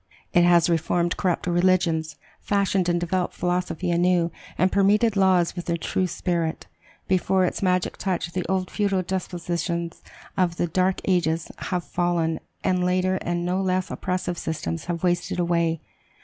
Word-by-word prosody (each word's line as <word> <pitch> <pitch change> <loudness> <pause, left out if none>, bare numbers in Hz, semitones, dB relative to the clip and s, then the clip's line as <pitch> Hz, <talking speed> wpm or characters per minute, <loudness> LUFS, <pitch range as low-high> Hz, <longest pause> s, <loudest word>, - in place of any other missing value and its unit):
It 175 - +5
has 175 -1 +5
reformed 170 +1 +1
corrupt 180 -3 0
religions, 175 -3 +2 0.2
fashioned 195 -3 +1
and 175 0 +2
developed 175 +1 -1
philosophy 180 0 -1
anew, 175 0 +2 0.3
and 185 +1 +3
permeated 205 +3 +3
laws 185 -3 +3
with 175 - -5
their 170 -1 0
true 185 +3 -1
spirit. 170 -2 -2 0.4
Before 185 0 +2
its - - -2
magic 185 -2 +1
touch, 175 -3 -2
the 180 - -1
old 185 -1 0
feudal 200 -3 +1
despotisms 170 -2 -3 0.3
of 180 -3 +1
the - - +1
dark 185 +2 +1
ages 170 -3 +1 0.2
have 180 -2 -1
fallen, 170 -2 0 0.2
and 180 -1 +1
later 185 +1 +1
and 175 -1 -2
no 180 +2 0
less 185 -1 0
oppressive 180 -1 -2
systems 160 0 -3
have 170 -1 -3
wasted 180 +1 0
away. 170 -2 +1
180 Hz, 150 wpm, -24 LUFS, 170-185 Hz, 0.4 s, It